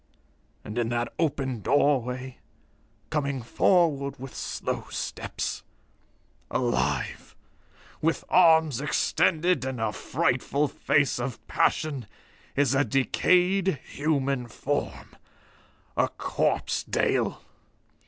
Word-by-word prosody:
And 105 Hz, +3 st, -4 dB
in 115 Hz, -1 st, 0 dB
that 120 Hz, 0 st, -2 dB
open 135 Hz, -6 st, 0 dB
doorway, 130 Hz, -1 st, +1 dB, 0.7 s
coming 140 Hz, -4 st, -1 dB
forward 140 Hz, 0 st, +2 dB
with 130 Hz, 0 st, -9 dB
slow -, -, -4 dB
steps -, -, -4 dB, 0.9 s
alive, 120 Hz, -2 st, -1 dB, 0.7 s
with 165 Hz, +1 st, +1 dB
arms 160 Hz, -6 st, +5 dB
extended 160 Hz, +1 st, +2 dB
and 130 Hz, -2 st, -3 dB
a 110 Hz, -1 st, -1 dB
frightful 145 Hz, +8 st, 0 dB
face 140 Hz, -1 st, +1 dB
of 120 Hz, 0 st, -5 dB
passion 140 Hz, -8 st, 0 dB, 0.5 s
is 140 Hz, -2 st, +3 dB
a 135 Hz, +1 st, +3 dB
decayed 180 Hz, -, +2 dB
human 140 Hz, -4 st, -1 dB
form. 115 Hz, -, -4 dB, 0.8 s
A -, -, +3 dB
corpse, -, -, -1 dB
Dale. -, -, 0 dB
140 Hz, 95 wpm, -27 LUFS, 125-155 Hz, 0.9 s, arms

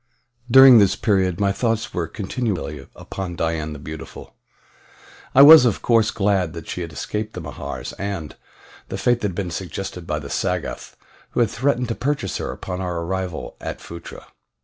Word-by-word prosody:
During 130 Hz, -1 st, +9 dB
this 100 Hz, -1 st, +4 dB
period 95 Hz, -4 st, +1 dB
my 100 Hz, -1 st, +2 dB
thoughts 115 Hz, +1 st, -1 dB
were 85 Hz, -2 st, -2 dB
continually 95 Hz, -, -4 dB
upon 95 Hz, -3 st, -6 dB
Dian 80 Hz, -2 st, -2 dB
the -, -, -7 dB
Beautiful. 75 Hz, +2 st, -9 dB, 1.0 s
I 135 Hz, -, +9 dB
was, 155 Hz, -1 st, +11 dB
of 120 Hz, -6 st, 0 dB
course, 115 Hz, -2 st, +3 dB
glad 95 Hz, -5 st, 0 dB
that 85 Hz, -2 st, -8 dB
she 90 Hz, -, -4 dB
had 85 Hz, -2 st, -5 dB
escaped 105 Hz, +8 st, -4 dB
the -, -, -6 dB
Mahars, -, -, -6 dB
and 95 Hz, -6 st, -4 dB, 0.5 s
the -, -, -4 dB
fate 120 Hz, -1 st, +1 dB
that 105 Hz, -, +1 dB
had 95 Hz, -, -6 dB
been 90 Hz, -2 st, -3 dB
suggested 90 Hz, 0 st, -6 dB
by 75 Hz, -, -1 dB
the 75 Hz, -2 st, -7 dB
Sagoth -, -, -3 dB, 0.4 s
who -, -, -1 dB
had 115 Hz, -, +2 dB
threatened 125 Hz, +1 st, 0 dB
to -, -, 0 dB
purchase 140 Hz, -5 st, -2 dB
her -, -, -4 dB
upon 90 Hz, 0 st, -6 dB
our 90 Hz, -2 st, -3 dB
arrival 95 Hz, -1 st, -4 dB
at -, -, -5 dB
Phutra. 85 Hz, 0 st, -10 dB
95 Hz, 175 wpm, -22 LUFS, 85-115 Hz, 1.0 s, was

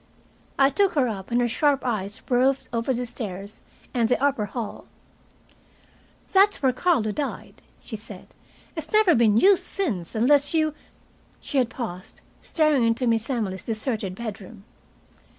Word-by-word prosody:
I 275 Hz, 0 st, +4 dB
took 390 Hz, +6 st, +2 dB
her 280 Hz, -5 st, +2 dB
up, 195 Hz, -4 st, -5 dB
and 240 Hz, 0 st, +1 dB
her 240 Hz, -, +2 dB
sharp 280 Hz, +3 st, +1 dB
eyes 205 Hz, -4 st, -3 dB
roved 260 Hz, +2 st, +2 dB
over 230 Hz, +3 st, 0 dB
the 250 Hz, 0 st, -1 dB
stairs 200 Hz, -3 st, -7 dB, 0.3 s
and 235 Hz, -2 st, +1 dB
the 250 Hz, -, +2 dB
upper 275 Hz, -6 st, +1 dB
hall. 225 Hz, +1 st, -6 dB, 1.5 s
"That's 395 Hz, -3 st, +4 dB
where 260 Hz, -1 st, +3 dB
Carlo 255 Hz, -7 st, +1 dB
died," 285 Hz, +6 st, -5 dB, 0.2 s
she 225 Hz, -, -6 dB
said. 210 Hz, -3 st, -9 dB, 0.5 s
"It's 315 Hz, -2 st, -6 dB
never 425 Hz, -5 st, +5 dB
been 225 Hz, -4 st, +4 dB
used 380 Hz, -, +5 dB
since, 230 Hz, -, -2 dB
unless 280 Hz, +7 st, +3 dB
you 310 Hz, -1 st, +2 dB, 0.3 s
" -, -, -36 dB, 0.3 s
she 280 Hz, -, -1 dB
had 245 Hz, -3 st, +1 dB
paused, 185 Hz, -8 st, -7 dB, 0.2 s
staring 305 Hz, -4 st, +2 dB
into 230 Hz, +2 st, +1 dB
Miss 230 Hz, 0 st, +1 dB
Emily's 210 Hz, -7 st, -2 dB
deserted 215 Hz, -4 st, -3 dB
bedroom. 210 Hz, -1 st, -8 dB
245 Hz, 150 wpm, -24 LUFS, 215-285 Hz, 1.5 s, never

